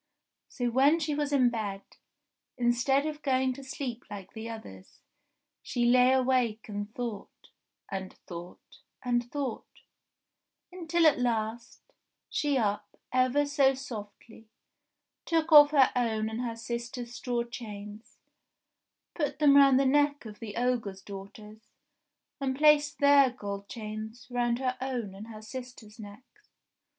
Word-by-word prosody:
So 245 Hz, -2 st, -2 dB
when 280 Hz, +6 st, +4 dB
she 305 Hz, -2 st, -1 dB
was 295 Hz, 0 st, -1 dB
in 255 Hz, -4 st, +4 dB
bed, 205 Hz, -4 st, -4 dB, 0.7 s
instead 245 Hz, +3 st, +2 dB
of 305 Hz, -1 st, -4 dB
going 260 Hz, -2 st, +1 dB
to 275 Hz, +2 st, -10 dB
sleep 260 Hz, -2 st, -6 dB
like 200 Hz, -2 st, -9 dB
the 225 Hz, 0 st, -7 dB
others, 95 Hz, -, -11 dB, 0.6 s
she 240 Hz, -1 st, -1 dB
lay 250 Hz, +1 st, +5 dB
awake 255 Hz, -4 st, +1 dB
and 205 Hz, 0 st, -5 dB
thought, 235 Hz, -4 st, -7 dB, 0.4 s
and 190 Hz, -1 st, -5 dB
thought, 175 Hz, 0 st, -11 dB, 0.3 s
and 240 Hz, 0 st, 0 dB
thought; 275 Hz, -5 st, -5 dB, 0.9 s
until 340 Hz, -2 st, 0 dB
at 300 Hz, -5 st, +5 dB
last 235 Hz, 0 st, -2 dB, 0.5 s
she 290 Hz, -2 st, +1 dB
up 205 Hz, -3 st, -2 dB, 0.2 s
ever 255 Hz, +3 st, +3 dB
so 280 Hz, -2 st, +3 dB
softly, 225 Hz, -3 st, -10 dB, 0.8 s
took 330 Hz, 0 st, 0 dB
off 295 Hz, -1 st, +10 dB
her 275 Hz, -4 st, +4 dB
own 220 Hz, -3 st, 0 dB
and 225 Hz, +2 st, -3 dB
her 235 Hz, -2 st, -3 dB
sisters' 235 Hz, +1 st, -5 dB
straw 240 Hz, 0 st, -2 dB
chains, 210 Hz, -2 st, -9 dB, 1.0 s
put 295 Hz, -5 st, -2 dB
them 290 Hz, -2 st, +5 dB
round 275 Hz, -2 st, +7 dB
the 275 Hz, -, +2 dB
neck 290 Hz, 0 st, +2 dB
of 210 Hz, -1 st, -10 dB
the 220 Hz, -3 st, -7 dB
ogre's 230 Hz, -6 st, -1 dB
daughters, 210 Hz, +2 st, -10 dB, 0.8 s
and 265 Hz, -1 st, -1 dB
placed 295 Hz, 0 st, +4 dB
their 280 Hz, -1 st, +6 dB
gold 200 Hz, -5 st, -7 dB
chains 220 Hz, +1 st, -7 dB
round 240 Hz, -1 st, +1 dB
her 255 Hz, 0 st, -1 dB
own 245 Hz, -7 st, -3 dB
and 200 Hz, +3 st, -10 dB
her 215 Hz, -1 st, -10 dB
sisters' 245 Hz, -2 st, -9 dB
necks. 220 Hz, -, -14 dB
245 Hz, 135 wpm, -29 LUFS, 215-270 Hz, 1.0 s, off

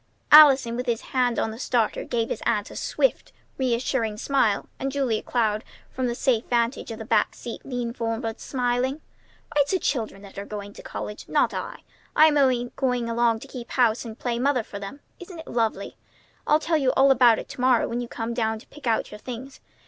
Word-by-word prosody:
Allison 275 Hz, -6 st, +8 dB
with 250 Hz, +1 st, -4 dB
his 235 Hz, -2 st, 0 dB
hand 250 Hz, -2 st, +2 dB
on 220 Hz, -, 0 dB
the 220 Hz, -, -9 dB
starter 235 Hz, -4 st, 0 dB
gave 230 Hz, -1 st, -2 dB
his -, -, -3 dB
aunt 210 Hz, -3 st, 0 dB
a -, -, -10 dB
swift, -, -, 0 dB, 0.3 s
reassuring 235 Hz, -3 st, 0 dB
smile; 225 Hz, -5 st, +1 dB
and 270 Hz, +1 st, -2 dB
Julia 260 Hz, -6 st, 0 dB
Cloud 220 Hz, -3 st, 0 dB, 0.3 s
from 255 Hz, -1 st, -2 dB
the 235 Hz, -, -2 dB
safe 240 Hz, -3 st, +1 dB
vantage 235 Hz, +2 st, 0 dB
of 225 Hz, -, -6 dB
the 220 Hz, -, -7 dB
back -, -, +1 dB
seat 235 Hz, -, -8 dB
leaned 245 Hz, -2 st, -4 dB
forward, 225 Hz, 0 st, -3 dB
smiling. 250 Hz, +1 st, -1 dB, 0.6 s
"Why, 290 Hz, -, +4 dB
it's 285 Hz, -, 0 dB
the -, -, +4 dB
children 225 Hz, -, -2 dB
that 200 Hz, 0 st, -10 dB
are 200 Hz, -, -6 dB
going 205 Hz, -1 st, -7 dB
to -, -, -11 dB
college, 210 Hz, -, -7 dB
Ellen, -, -, -12 dB
not -, -, +3 dB
I. -, -, -6 dB, 0.3 s
I'm 310 Hz, 0 st, +6 dB
only 255 Hz, -4 st, +2 dB
going 250 Hz, -3 st, 0 dB
along 230 Hz, -1 st, +2 dB
to -, -, -10 dB
keep 250 Hz, -3 st, -8 dB
house 240 Hz, -3 st, +2 dB
and 225 Hz, -2 st, -8 dB
play 235 Hz, -1 st, -2 dB
mother 260 Hz, -2 st, +1 dB
for 200 Hz, -, -8 dB
them. 230 Hz, +9 st, -8 dB, 0.2 s
Isn't 360 Hz, -1 st, -10 dB
it 320 Hz, -, -10 dB
lovely? 225 Hz, -2 st, -2 dB, 0.5 s
I'll 300 Hz, -, +5 dB
tell 325 Hz, 0 st, +1 dB
you 270 Hz, -3 st, +2 dB
all 270 Hz, +1 st, +5 dB
about 240 Hz, -4 st, +6 dB
it -, -, -6 dB
to -, -, -7 dB
morrow 250 Hz, -2 st, +3 dB
when 240 Hz, +1 st, -3 dB
you 240 Hz, -, -5 dB
come 230 Hz, 0 st, -4 dB
down 220 Hz, -2 st, 0 dB
to 215 Hz, -, -15 dB
pick 295 Hz, -4 st, -10 dB
out 225 Hz, -, 0 dB
your 210 Hz, -, -9 dB
things. 255 Hz, +3 st, -8 dB
240 Hz, 215 wpm, -25 LUFS, 225-265 Hz, 0.6 s, Allison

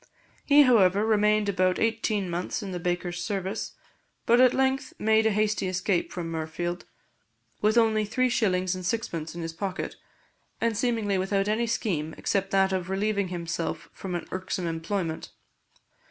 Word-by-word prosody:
He, 290 Hz, 0 st, +7 dB
however, 205 Hz, -5 st, +4 dB
remained 210 Hz, -1 st, +3 dB
about 185 Hz, -2 st, +2 dB
eighteen 220 Hz, -3 st, 0 dB
months 180 Hz, +6 st, -3 dB
in 195 Hz, -, -5 dB
the 180 Hz, -, -4 dB
baker's 175 Hz, 0 st, -2 dB
service, 195 Hz, 0 st, -3 dB, 0.5 s
but 240 Hz, +2 st, +5 dB
at 255 Hz, -1 st, +7 dB
length 265 Hz, +1 st, 0 dB
made 220 Hz, +1 st, +3 dB
a -, -, +4 dB
hasty 210 Hz, -1 st, +1 dB
escape 185 Hz, 0 st, 0 dB
from 170 Hz, -2 st, -4 dB
Mirfield, 165 Hz, +2 st, -4 dB, 0.8 s
with 215 Hz, +2 st, +3 dB
only 220 Hz, -2 st, +4 dB
three 255 Hz, +5 st, +1 dB
shillings 185 Hz, -6 st, +1 dB
and 185 Hz, 0 st, -5 dB
sixpence 175 Hz, -6 st, -3 dB
in 170 Hz, -, -5 dB
his 165 Hz, 0 st, -5 dB
pocket, 190 Hz, +2 st, -4 dB, 0.6 s
and 230 Hz, -1 st, +1 dB
seemingly 215 Hz, -4 st, 0 dB
without 195 Hz, +1 st, 0 dB
any 225 Hz, +3 st, +1 dB
scheme 160 Hz, -9 st, -2 dB
except 195 Hz, -1 st, -1 dB
that 195 Hz, 0 st, +2 dB
of 185 Hz, -1 st, -2 dB
relieving 200 Hz, 0 st, 0 dB
himself 170 Hz, -2 st, -4 dB
from 185 Hz, -2 st, -5 dB
an 170 Hz, -, -4 dB
irksome 185 Hz, 0 st, -3 dB
employment. 165 Hz, 0 st, -3 dB
195 Hz, 155 wpm, -27 LUFS, 180-220 Hz, 0.8 s, He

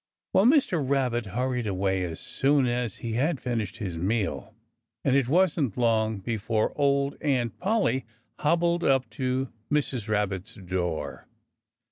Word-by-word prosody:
Well, 190 Hz, -, +5 dB
Mr. 255 Hz, -, +3 dB
Rabbit 130 Hz, -4 st, 0 dB
hurried 125 Hz, +3 st, -1 dB
away 95 Hz, -1 st, 0 dB
as 80 Hz, -2 st, -6 dB
soon 140 Hz, 0 st, +2 dB
as 120 Hz, -3 st, -1 dB
he 115 Hz, -, -2 dB
had 140 Hz, +5 st, +1 dB
finished 115 Hz, -4 st, -3 dB
his 95 Hz, -7 st, -4 dB
meal. 100 Hz, +3 st, -1 dB, 0.5 s
And 135 Hz, -, +3 dB
it 135 Hz, -3 st, +2 dB
wasn't 155 Hz, -, +2 dB
long 110 Hz, -2 st, +2 dB
before 110 Hz, +1 st, -1 dB
old 140 Hz, -1 st, +1 dB
Aunt 130 Hz, -7 st, 0 dB
Polly 195 Hz, -9 st, +1 dB, 0.3 s
hobbled 170 Hz, +2 st, +2 dB
up 135 Hz, -1 st, +3 dB
to 130 Hz, -1 st, -1 dB, 0.2 s
Mrs. 135 Hz, -6 st, 0 dB
Rabbit's 105 Hz, -3 st, -1 dB
door. 85 Hz, -7 st, -3 dB
125 Hz, 135 wpm, -27 LUFS, 105-140 Hz, 0.5 s, Well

